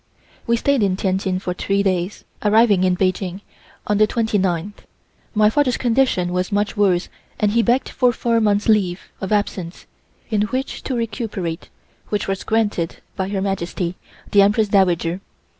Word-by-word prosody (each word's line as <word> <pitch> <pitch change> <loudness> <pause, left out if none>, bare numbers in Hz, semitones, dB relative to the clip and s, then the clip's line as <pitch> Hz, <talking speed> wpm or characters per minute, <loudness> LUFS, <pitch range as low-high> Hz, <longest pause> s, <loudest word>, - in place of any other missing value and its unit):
We 235 0 +3
stayed 280 +1 +1
in 195 -2 +2
Tientsin 190 -1 -1
for 180 -1 -3
three 195 +2 0
days, 185 0 -1 0.2
arriving 210 -2 +4
in 180 -1 +2
Peking 185 0 -1 0.4
on 210 0 +1
the 215 - +5
twenty 220 -2 0
ninth. 185 +2 -2 0.5
My 210 0 +5
father's 250 +3 +2
condition 235 -8 +1
was 180 +3 -1
much 205 +1 0
worse 190 -4 +2 0.3
and 210 -1 +2
he 230 +2 +3
begged 245 +3 +1
for 250 -2 +2
four 230 0 0
months' 205 -1 +2
leave 195 -5 +1
of 190 - -4
absence, 195 -4 -2 0.5
in 210 -2 +2
which 260 +5 -3
to 260 - -2
recuperate, 205 -7 -4 0.4
which 210 -2 -1
was 195 -1 -2
granted 210 -7 0 0.2
by 190 -1 -2
Her 195 -1 -2
Majesty, 180 -2 -2 0.4
the 200 - +6
Empress 205 +1 +3
Dowager. 180 -2 +2
205 Hz, 160 wpm, -20 LUFS, 185-220 Hz, 0.5 s, the